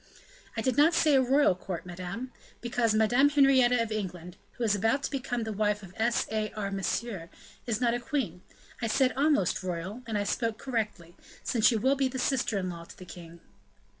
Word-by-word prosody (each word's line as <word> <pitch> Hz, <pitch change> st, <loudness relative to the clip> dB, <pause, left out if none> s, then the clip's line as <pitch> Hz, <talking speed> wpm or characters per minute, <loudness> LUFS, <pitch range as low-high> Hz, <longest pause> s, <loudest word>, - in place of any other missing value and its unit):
"I -, -, 0 dB
did 255 Hz, 0 st, 0 dB
not 320 Hz, +4 st, +5 dB
say 305 Hz, -2 st, +4 dB
a 265 Hz, -, +6 dB
royal 265 Hz, -3 st, +4 dB
court, 180 Hz, -1 st, -6 dB
madame," 180 Hz, +4 st, -6 dB
replied -, -, -3 dB
Montalais; 255 Hz, -, -14 dB
"because 240 Hz, -2 st, +1 dB
Madame 240 Hz, +6 st, +4 dB
Henrietta 260 Hz, -4 st, +4 dB
of 225 Hz, -, -6 dB
England, 180 Hz, -4 st, -5 dB, 0.2 s
who 245 Hz, -, -5 dB
is 215 Hz, -3 st, +3 dB
about 225 Hz, +7 st, +1 dB
to -, -, -2 dB
become 245 Hz, -4 st, -2 dB
the 220 Hz, -1 st, -4 dB
wife 210 Hz, 0 st, 0 dB
of 185 Hz, -1 st, -12 dB
S. 230 Hz, +2 st, +1 dB
A. 215 Hz, -1 st, -1 dB
R. 200 Hz, -2 st, -3 dB
Monsieur, 195 Hz, -1 st, -3 dB, 0.4 s
is 225 Hz, -2 st, 0 dB
not 240 Hz, -2 st, +2 dB
a 240 Hz, -, -1 dB
queen. 235 Hz, -, -3 dB, 0.4 s
I 230 Hz, -, 0 dB
said 255 Hz, +3 st, +2 dB
almost 280 Hz, -, +2 dB
royal, 185 Hz, +5 st, -4 dB
and 220 Hz, -2 st, -1 dB
I 205 Hz, -, 0 dB
spoke 225 Hz, +2 st, -1 dB
correctly, 215 Hz, -9 st, -4 dB, 0.3 s
since 230 Hz, -4 st, +3 dB
she 240 Hz, -, +3 dB
will 260 Hz, +5 st, +2 dB
be 270 Hz, -1 st, +1 dB
sister 255 Hz, -4 st, 0 dB
in 185 Hz, -1 st, -2 dB
law 170 Hz, -1 st, -9 dB
to -, -, -14 dB
the 185 Hz, -, -11 dB
king." 170 Hz, -1 st, -12 dB
225 Hz, 210 wpm, -29 LUFS, 195-255 Hz, 0.4 s, a